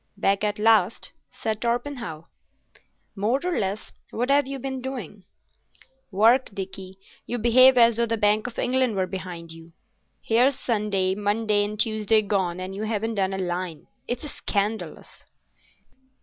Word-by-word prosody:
"Back 200 Hz, 0 st, +1 dB
at 210 Hz, -1 st, 0 dB
last?" 220 Hz, +1 st, +2 dB, 0.2 s
said 220 Hz, -1 st, -4 dB
Torpenhow. 235 Hz, -, -3 dB, 0.9 s
"More 220 Hz, +6 st, +1 dB
or 360 Hz, -1 st, -1 dB
less. 200 Hz, +1 st, -3 dB, 0.2 s
What 245 Hz, +4 st, -1 dB
have 285 Hz, -1 st, +3 dB
you 275 Hz, 0 st, -4 dB
been 265 Hz, 0 st, -5 dB
doing?" 235 Hz, -, -7 dB, 0.8 s
"Work. 225 Hz, +6 st, +4 dB
Dickie, 190 Hz, -1 st, -7 dB, 0.3 s
you 245 Hz, -, -2 dB
behave 255 Hz, +3 st, +6 dB
as 235 Hz, -1 st, +5 dB
though 235 Hz, 0 st, +1 dB
the 230 Hz, 0 st, -1 dB
Bank 210 Hz, +1 st, +2 dB
of 245 Hz, -, -9 dB
England 255 Hz, -3 st, +1 dB
were 190 Hz, -1 st, +1 dB
behind 180 Hz, -3 st, -7 dB
you. 165 Hz, 0 st, -13 dB, 0.5 s
Here's 250 Hz, +4 st, +3 dB
Sunday, 205 Hz, -5 st, 0 dB
Monday, 205 Hz, +1 st, +1 dB
and 210 Hz, 0 st, -5 dB
Tuesday 215 Hz, -1 st, +2 dB
gone 190 Hz, -4 st, -1 dB
and 185 Hz, +1 st, -5 dB
you 200 Hz, -, -6 dB
haven't 220 Hz, +1 st, -2 dB
done 195 Hz, -2 st, 0 dB
a -, -, -3 dB
line. 175 Hz, -3 st, -4 dB, 0.2 s
It's 245 Hz, +5 st, -3 dB
scandalous." 210 Hz, -4 st, -4 dB
215 Hz, 150 wpm, -24 LUFS, 195-240 Hz, 0.9 s, behave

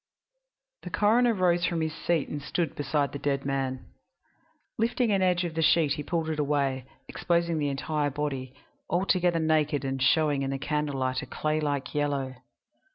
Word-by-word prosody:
III -, -, -60 dB
The -, -, -3 dB
coroner 230 Hz, +3 st, +4 dB
rose 175 Hz, -2 st, +2 dB
from 170 Hz, -1 st, -1 dB
his 160 Hz, -1 st, -1 dB
seat 165 Hz, -1 st, 0 dB
and 145 Hz, -, -5 dB
stood 160 Hz, +1 st, -2 dB
beside 145 Hz, 0 st, -1 dB
the 140 Hz, -, -6 dB
dead 140 Hz, -1 st, -1 dB
man. 135 Hz, -2 st, -2 dB, 0.9 s
Lifting 235 Hz, 0 st, +1 dB
an 195 Hz, -1 st, +2 dB
edge 180 Hz, -1 st, +2 dB
of 170 Hz, -2 st, -3 dB
the 165 Hz, -, -1 dB
sheet 160 Hz, -2 st, +4 dB
he 145 Hz, -, -1 dB
pulled 165 Hz, +1 st, -2 dB
it 155 Hz, -, -3 dB
away, 140 Hz, -3 st, 0 dB, 0.2 s
exposing 170 Hz, -2 st, 0 dB
the 145 Hz, -1 st, 0 dB
entire 145 Hz, +1 st, -1 dB
body, 135 Hz, -2 st, -4 dB, 0.3 s
altogether 180 Hz, -1 st, +2 dB
naked 155 Hz, -3 st, +1 dB
and 135 Hz, 0 st, -2 dB
showing 145 Hz, +1 st, +3 dB
in 135 Hz, -, -1 dB
the 135 Hz, -, -2 dB
candle 150 Hz, 0 st, -2 dB
light 130 Hz, 0 st, 0 dB
a -, -, -8 dB
clay 155 Hz, 0 st, -1 dB
like 145 Hz, -3 st, -2 dB
yellow. 140 Hz, -3 st, -1 dB
150 Hz, 180 wpm, -27 LUFS, 140-170 Hz, 0.9 s, coroner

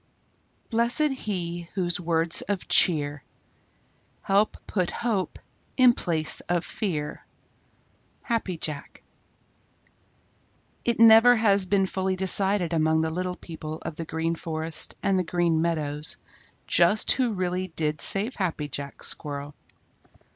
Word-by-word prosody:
Blessed 240 Hz, +6 st, +1 dB
he 175 Hz, -8 st, -4 dB
whose 175 Hz, -3 st, 0 dB
words 165 Hz, -1 st, +2 dB
of 200 Hz, -3 st, -4 dB
cheer 145 Hz, -4 st, +3 dB, 1.0 s
Help 200 Hz, +2 st, +1 dB
put 180 Hz, -4 st, -1 dB
hope 220 Hz, -6 st, -3 dB, 0.4 s
in 255 Hz, -2 st, +6 dB
place 160 Hz, -7 st, +1 dB
of 175 Hz, -1 st, 0 dB
fear. 155 Hz, -8 st, -4 dB, 1.0 s
Happy 225 Hz, -8 st, -2 dB
Jack. 150 Hz, -2 st, -6 dB, 1.8 s
It 235 Hz, -1 st, 0 dB
never 225 Hz, +2 st, +7 dB
has 200 Hz, -4 st, +2 dB
been 195 Hz, 0 st, +2 dB
fully 190 Hz, 0 st, -2 dB
decided 190 Hz, -1 st, +3 dB
among 160 Hz, 0 st, +2 dB
the 160 Hz, 0 st, -2 dB
little 180 Hz, +2 st, -3 dB
people 160 Hz, -3 st, -8 dB
of -, -, -6 dB
the 165 Hz, -, -6 dB
Green 160 Hz, +1 st, -2 dB
Forest 160 Hz, -1 st, -2 dB
and 195 Hz, -1 st, +1 dB
the -, -, 0 dB
Green 170 Hz, -2 st, 0 dB
Meadows 155 Hz, -2 st, -2 dB, 0.5 s
just 175 Hz, +5 st, +3 dB
who 250 Hz, -4 st, +1 dB
really 185 Hz, -1 st, -2 dB
did 155 Hz, -3 st, -3 dB
save 210 Hz, +6 st, +2 dB
Happy 170 Hz, -6 st, -2 dB
Jack 140 Hz, 0 st, -7 dB
Squirrel. 145 Hz, 0 st, -2 dB
175 Hz, 120 wpm, -25 LUFS, 160-200 Hz, 1.8 s, never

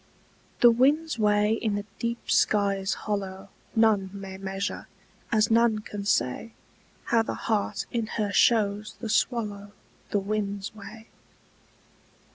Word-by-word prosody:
THE 240 Hz, -, +8 dB
wind's 285 Hz, +4 st, +2 dB
way 210 Hz, 0 st, +3 dB
in 215 Hz, -3 st, 0 dB
the 205 Hz, 0 st, -3 dB
deep 235 Hz, 0 st, -3 dB
sky's 200 Hz, -1 st, +2 dB
hollow 195 Hz, -2 st, -3 dB, 0.3 s
None 215 Hz, -4 st, +3 dB
may 195 Hz, -1 st, -7 dB
measure, 195 Hz, +1 st, -4 dB, 0.4 s
as 215 Hz, -1 st, +3 dB
none 230 Hz, -1 st, +4 dB
can 205 Hz, -1 st, -7 dB
say 205 Hz, -, 0 dB, 0.5 s
How 230 Hz, -1 st, +2 dB
the 225 Hz, -, -3 dB
heart 215 Hz, -3 st, -1 dB
in 230 Hz, -2 st, -1 dB
her 210 Hz, -2 st, 0 dB
shows 210 Hz, -1 st, +2 dB
the 225 Hz, -, -5 dB
swallow 205 Hz, -4 st, -1 dB, 0.4 s
The -, -, +1 dB
wind's 200 Hz, 0 st, -3 dB
way. 215 Hz, +1 st, -11 dB
210 Hz, 125 wpm, -27 LUFS, 200-225 Hz, 0.5 s, THE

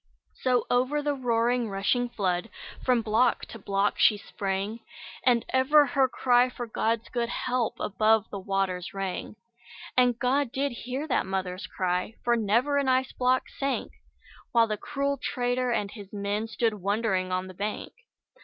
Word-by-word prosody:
So 250 Hz, -1 st, +2 dB
over 260 Hz, +4 st, +2 dB
the 290 Hz, 0 st, +1 dB
roaring 240 Hz, -2 st, +1 dB
rushing 210 Hz, +5 st, 0 dB
flood, 185 Hz, -2 st, -1 dB, 0.3 s
From 250 Hz, -3 st, +2 dB
block 220 Hz, +3 st, +2 dB
to 225 Hz, -, -10 dB
block 200 Hz, 0 st, 0 dB
she 210 Hz, -, +5 dB
sprang, 200 Hz, +2 st, -3 dB, 0.4 s
And 240 Hz, -2 st, +3 dB
ever 290 Hz, +3 st, +5 dB
her 270 Hz, 0 st, +2 dB
cry 250 Hz, 0 st, +3 dB
for 245 Hz, -1 st, -6 dB
God's 225 Hz, 0 st, -1 dB
good 235 Hz, -1 st, -1 dB
help 250 Hz, -1 st, -1 dB
Above 220 Hz, +1 st, +2 dB
the 200 Hz, -, -4 dB
waters 190 Hz, -1 st, -2 dB
rang. 195 Hz, +1 st, -4 dB, 0.6 s
And 245 Hz, -2 st, +4 dB
God 260 Hz, +1 st, +1 dB
did 275 Hz, +2 st, -1 dB
hear 255 Hz, +5 st, -5 dB
that 255 Hz, -, 0 dB
mother's 190 Hz, -1 st, -3 dB
cry, 180 Hz, +3 st, -2 dB
For 240 Hz, 0 st, +3 dB
never 235 Hz, +6 st, +2 dB
an 280 Hz, -, 0 dB
ice 260 Hz, 0 st, +2 dB
block 255 Hz, +1 st, +2 dB, 0.2 s
sank; 275 Hz, -1 st, -1 dB, 0.6 s
While 230 Hz, -1 st, +6 dB
the 215 Hz, -1 st, -2 dB
cruel 280 Hz, +5 st, -2 dB
trader 250 Hz, 0 st, 0 dB
and 205 Hz, -4 st, -1 dB
his 200 Hz, -4 st, -11 dB
men 205 Hz, +2 st, -2 dB
Stood 225 Hz, 0 st, 0 dB
wondering 195 Hz, -2 st, 0 dB
on 185 Hz, 0 st, -1 dB
the 185 Hz, -, -9 dB
bank. 205 Hz, +3 st, -4 dB
230 Hz, 160 wpm, -27 LUFS, 200-255 Hz, 0.6 s, While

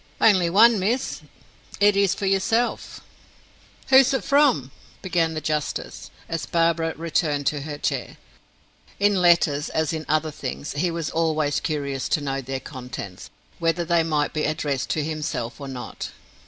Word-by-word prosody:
"Only 185 Hz, -6 st, +4 dB
one 220 Hz, +4 st, +6 dB
miss. 230 Hz, +8 st, -1 dB, 0.6 s
It 205 Hz, 0 st, +5 dB
is 200 Hz, -1 st, +3 dB
for 200 Hz, -, -4 dB
yourself." 195 Hz, +5 st, 0 dB, 0.9 s
"Who 265 Hz, -, +8 dB
is 270 Hz, 0 st, +5 dB
it -, -, -2 dB
from?" 275 Hz, -, +3 dB, 0.3 s
began 165 Hz, -3 st, 0 dB
the 155 Hz, -, -3 dB
justice, 150 Hz, -2 st, -3 dB, 0.2 s
as 165 Hz, -1 st, -4 dB
Barbara 165 Hz, -1 st, +1 dB
returned 155 Hz, -3 st, -1 dB
to 145 Hz, -, -4 dB
her 145 Hz, 0 st, -6 dB
chair. -, -, -3 dB, 0.8 s
In 200 Hz, -2 st, +3 dB
letters 170 Hz, -4 st, +3 dB
as 160 Hz, 0 st, -1 dB
in 155 Hz, -1 st, -5 dB
other 155 Hz, +1 st, +1 dB
things, 145 Hz, 0 st, -5 dB
he 175 Hz, +5 st, 0 dB
was 165 Hz, -2 st, -3 dB
always 155 Hz, -3 st, +1 dB
curious 140 Hz, -4 st, -3 dB
to -, -, +2 dB
know 135 Hz, -1 st, -2 dB
their 135 Hz, +1 st, -4 dB
contents, 125 Hz, -9 st, -8 dB, 0.3 s
whether 170 Hz, +1 st, 0 dB
they 170 Hz, 0 st, +3 dB
might 155 Hz, -2 st, 0 dB
be 155 Hz, -, -1 dB
addressed 145 Hz, -3 st, -2 dB
to 155 Hz, -, 0 dB
himself 150 Hz, -6 st, -4 dB
or 140 Hz, -, -6 dB
not. 130 Hz, -2 st, -6 dB
160 Hz, 155 wpm, -24 LUFS, 145-180 Hz, 0.9 s, Who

